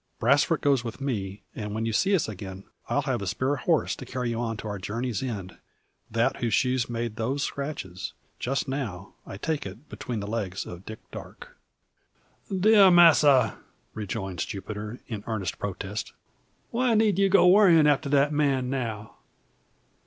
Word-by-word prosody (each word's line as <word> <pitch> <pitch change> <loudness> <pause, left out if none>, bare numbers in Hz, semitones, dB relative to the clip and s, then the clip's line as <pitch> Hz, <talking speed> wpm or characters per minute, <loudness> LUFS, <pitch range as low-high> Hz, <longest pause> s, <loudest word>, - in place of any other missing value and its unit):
Brasfort - - +3
goes 140 -4 +2
with 115 0 -6
me; 105 -8 -3
and 105 -1 -5
when 110 +1 -1
you 115 - -1
see 195 - +3
us 180 - 0
again, 95 -2 -7 0.3
I'll - - +1
have - - -1
a - - -4
spare 135 +3 0
horse 160 +1 +1
to - - -8
carry 125 -1 -3
you 115 - -2
on 115 -2 -2
to 110 - -6
our 105 -1 -4
journey's 115 +4 -3
end; 105 -8 -5 0.5
that 115 +4 +1
whose 115 -2 0
shoes 130 -3 +1
made 115 -1 -3
those 130 +5 -1
scratches 140 -11 -5 0.3
just 135 +3 -1
now, 115 -9 -4
I 95 - -7
take 155 +7 -2
it, 110 +10 -10
between 120 -3 -5
the 100 - -4
legs 100 -3 -3
of 90 +2 -10
Dick 110 - -6
Darke." - - -10 0.9
"Dear 200 +1 +6
masser," 150 - +6 0.3
rejoins 95 -3 -4
Jupiter, 105 +3 -6
in 110 -4 -6
earnest 105 -6 -3
protest. 100 +1 -4 0.6
"Why 240 -1 +2
need 210 -3 +3
ye 195 0 +4
go 190 -1 +6
worryin' 180 -5 +7
after 145 0 +2
that 145 +1 +3
man 135 -4 +1
now? 110 -5 -4
120 Hz, 165 wpm, -26 LUFS, 105-145 Hz, 0.9 s, worryin